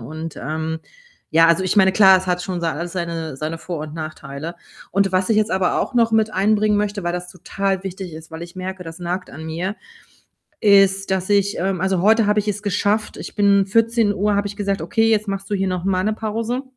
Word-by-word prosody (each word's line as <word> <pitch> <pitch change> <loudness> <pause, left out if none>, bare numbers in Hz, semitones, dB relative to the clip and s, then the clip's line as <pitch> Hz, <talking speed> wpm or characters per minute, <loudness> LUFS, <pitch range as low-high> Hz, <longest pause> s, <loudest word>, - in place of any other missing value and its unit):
und 155 +6 -7
ähm 160 +2 -3 0.5
ja, 165 +1 +6
also 170 +2 +3
ich 185 +3 -1
meine, 190 -1 +5
klar, 190 -2 +7
es 185 - -7
hat 180 0 0
schon 180 -1 -4
sei 165 -1 0
alles 170 +3 -5
seine 165 -5 -4
seine 155 +3 -4
Vor 170 -1 -5
und 150 0 -7
Nachteile 155 0 -7 0.3
und 195 -1 +1
was 185 +2 +1
ich 220 - +3
jetzt 215 +1 +2
aber 190 -1 +1
auch - - -3
noch 230 -2 +3
mit 220 -1 +2
einbringen 210 +1 +2
möchte, 205 -2 -2
weil 175 - 0
das 180 0 -5
total 195 +1 -3
wichtig 190 -2 -6
ist, 160 +1 -11
weil 160 +1 -7
ich 175 +2 -10
merke, 185 0 -5
das 165 0 -9
nagt 180 +1 -4
an 160 0 -9
mir, 175 +6 -3 0.8
ist, 195 -2 +4
dass 190 0 -1
ich 200 0 +2
ähm, 190 -1 -1
also 190 -1 +1
heute 220 +3 +4
habe 210 +1 +2
ich 210 - 0
es 210 0 -2
geschafft, 205 +2 0
ich - - -8
bin 200 -1 +4
14:00 210 -2 +2
habe 205 0 0
ich 205 - -5
gesagt: 200 -1 -1
„Okay, 225 0 +2
jetzt 215 -1 +2
machst 195 0 -4
du 205 - +1
hier 195 - 0
noch 180 -1 -3
mal 185 -1 +1
‘ne 215 - +1
Pause.” 225 +4 -3
190 Hz, 230 wpm, -21 LUFS, 175-205 Hz, 0.8 s, klar